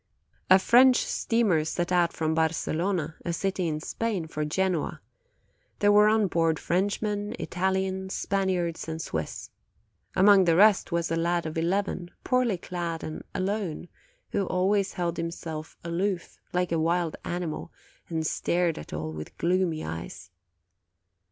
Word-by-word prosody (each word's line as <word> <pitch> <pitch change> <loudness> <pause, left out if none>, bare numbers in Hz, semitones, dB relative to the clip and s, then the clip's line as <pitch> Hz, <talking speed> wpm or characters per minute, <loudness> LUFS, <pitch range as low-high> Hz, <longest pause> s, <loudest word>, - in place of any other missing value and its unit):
"A 185 - +9
French 250 +6 +6
steamer 215 -9 +1
set 175 +3 -2
out 175 -2 +3
from 160 -1 -1
Barcelona, 160 +1 0
a 170 - -2
city 185 +1 -1
in 155 -1 -2
Spain, 205 +1 -2
for 155 -1 -4
Genoa; 175 +2 -1 0.8
there 205 0 +4
were 210 +1 +6
on 215 -1 +3
board 165 -3 +1
Frenchmen, 205 +4 -1
Italians, 190 +1 -1
Spaniards, 185 -4 -1
and 160 0 -4
Swiss. 80 - -4 0.6
Among 195 0 +6
the 165 -1 +4
rest 205 +1 +5
was 170 -1 0
a - - +2
lad 170 +1 0
of 155 - -4
eleven, 175 +1 -1
poorly 250 -6 +2
clad, 170 -2 -4
and 155 - -5
alone, 185 -4 -2 0.4
who 195 - 0
always 190 +2 +1
held 175 -2 -2
himself 165 -2 -5
aloof, 175 +1 -2
like 180 -1 0
a 165 - +1
wild 170 0 +1
animal, 175 -2 -4 0.4
and 160 -2 -2
stared 170 +1 0
at 75 - -10
all 80 +1 -4
with 75 0 -8
gloomy 175 -2 +1
eyes. 80 +3 -7
175 Hz, 140 wpm, -27 LUFS, 160-195 Hz, 0.8 s, A